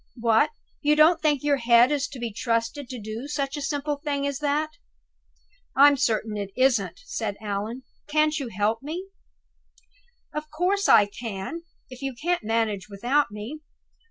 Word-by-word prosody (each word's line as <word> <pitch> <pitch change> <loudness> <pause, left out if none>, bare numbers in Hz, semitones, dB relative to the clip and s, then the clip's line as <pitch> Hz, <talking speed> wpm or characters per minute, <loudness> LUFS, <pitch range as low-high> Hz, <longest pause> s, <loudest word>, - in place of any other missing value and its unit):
What! 230 +2 +3 0.3
you 300 0 +3
don't 315 +2 +5
think 295 -3 +2
your 290 -1 +3
head 235 +1 +5
is 285 -1 0
to 275 - -10
be 235 -3 -4
trusted 230 +4 -1
to 255 - -6
do 220 +5 -6
such 280 -1 -2
a 290 - -4
simple 290 0 -2
thing 285 -1 -2
as 280 -1 -2
that?" 300 +1 0 1.0
"I'm 285 +1 +7
certain 220 -5 0
it 200 -1 -4
isn't," 255 - +2
said 220 - -3
Allan. 215 +4 -4 0.2
"Can't 305 0 +2
you 275 - -4
help 215 +2 0
me?" 340 +7 -6 1.2
"Of 300 0 -5
course 365 +6 +1
I 205 - +8
can, 205 - -6 0.3
if 255 +1 -10
you 270 -2 -3
can't 350 -3 0
manage 215 -2 -1
without 245 +9 +1
me! 210 +9 -7
270 Hz, 160 wpm, -25 LUFS, 225-295 Hz, 1.2 s, I